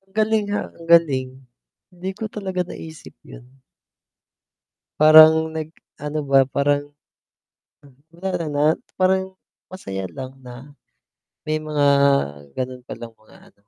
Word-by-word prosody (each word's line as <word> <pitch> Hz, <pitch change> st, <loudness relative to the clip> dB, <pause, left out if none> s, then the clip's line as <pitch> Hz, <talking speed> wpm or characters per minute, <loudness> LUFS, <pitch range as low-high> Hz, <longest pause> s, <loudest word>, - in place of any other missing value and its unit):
Galing 215 Hz, -1 st, +1 dB
nga, 205 Hz, 0 st, -3 dB
ang 165 Hz, -, -15 dB
galing, 145 Hz, -7 st, +3 dB, 0.6 s
hindi 180 Hz, +1 st, -6 dB
ko 215 Hz, +1 st, -6 dB
talaga 190 Hz, -3 st, -3 dB
naisip 160 Hz, -2 st, -11 dB
'yun. 130 Hz, +1 st, -15 dB, 1.4 s
Parang 155 Hz, +1 st, +7 dB
nag-ano 155 Hz, -1 st, -7 dB
ba, 135 Hz, -1 st, +3 dB
parang 145 Hz, +1 st, -1 dB, 1.2 s
Wala 175 Hz, -1 st, -4 dB
na, 145 Hz, 0 st, 0 dB, 0.4 s
parang 190 Hz, 0 st, +1 dB, 0.4 s
masaya 95 Hz, -, -6 dB
lang 130 Hz, +6 st, -9 dB
na 130 Hz, +4 st, -12 dB, 0.7 s
may 155 Hz, 0 st, -2 dB
mga 150 Hz, -1 st, -2 dB, 0.7 s
ganun 130 Hz, 0 st, -5 dB
pa -, -, -6 dB
lang 115 Hz, -1 st, -10 dB
mga 110 Hz, -, -22 dB, 0.2 s
ano. -, -, -48 dB
155 Hz, 115 wpm, -21 LUFS, 135-180 Hz, 1.4 s, Parang